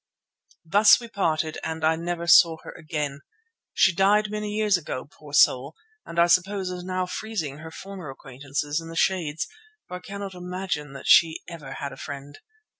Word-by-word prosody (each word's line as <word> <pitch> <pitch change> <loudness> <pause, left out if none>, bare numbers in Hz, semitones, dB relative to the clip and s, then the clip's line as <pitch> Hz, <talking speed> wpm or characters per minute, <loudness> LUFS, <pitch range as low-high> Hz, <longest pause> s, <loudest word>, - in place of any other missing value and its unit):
Thus 205 +6 +6
we 235 - -9
parted, 160 -6 -1
and 160 0 -4
I 160 +1 +4
never 170 +1 -4
saw 170 -1 +7
her - - -8
again. 150 -3 -4 0.5
She 185 - +4
died 205 +3 +3
many 210 0 -3
years 210 -1 +2
ago, 145 -6 -4
poor 145 0 -15
soul, 140 0 +4 0.3
and 170 - -8
I 170 - +6
suppose 185 +2 +1
is 180 -1 -6
now 185 0 -2
freezing 180 -7 -4
her 160 +1 -9
former 190 -2 -9
acquaintances 140 +3 -4
in 165 - -10
the 165 - -8
Shades, 165 -3 0 0.4
for 180 - -6
I - - -11
cannot 200 +1 -7
imagine 180 -5 -4
that 135 - -9
she 165 -3 +5
ever 155 -6 -8
had 140 - -5
a - - -12
friend. 145 0 -8
170 Hz, 180 wpm, -25 LUFS, 150-190 Hz, 0.5 s, saw